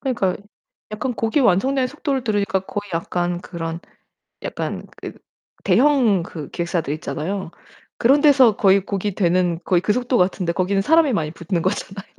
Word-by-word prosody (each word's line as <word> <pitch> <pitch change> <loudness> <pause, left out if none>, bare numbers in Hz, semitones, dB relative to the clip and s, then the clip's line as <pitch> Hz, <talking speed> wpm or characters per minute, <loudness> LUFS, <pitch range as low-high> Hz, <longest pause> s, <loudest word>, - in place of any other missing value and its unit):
그니까요. 235 -9 -1 0.5
약간 220 +4 -3
곡이 225 +6 0
완성되는 255 +5 +2
속도를 275 -2 -3
들으니까 205 -3 0
거의 205 +1 -6
약간 175 +1 -2
그런 165 -2 -6 0.6
약간 - - -4
그 - - -8 0.5
대형 250 -9 +3
그 155 -4 -8
기획사들 170 -4 -2
있잖아요. 160 +6 -4 0.5
그런 275 +5 +4
데서 265 -7 +5
거의 195 -3 +4
곡이 200 -1 -3
되는 175 -2 +1
거의 180 -2 +2
그 210 - +1
속도 245 +1 0
같은데 180 -1 +1
거기는 195 +2 0
사람이 320 0 +4
많이 155 -6 -1
붙는 170 +1 -3
거잖아요. 195 0 -3
195 Hz, 350 characters per minute, -21 LUFS, 175-245 Hz, 0.6 s, 데서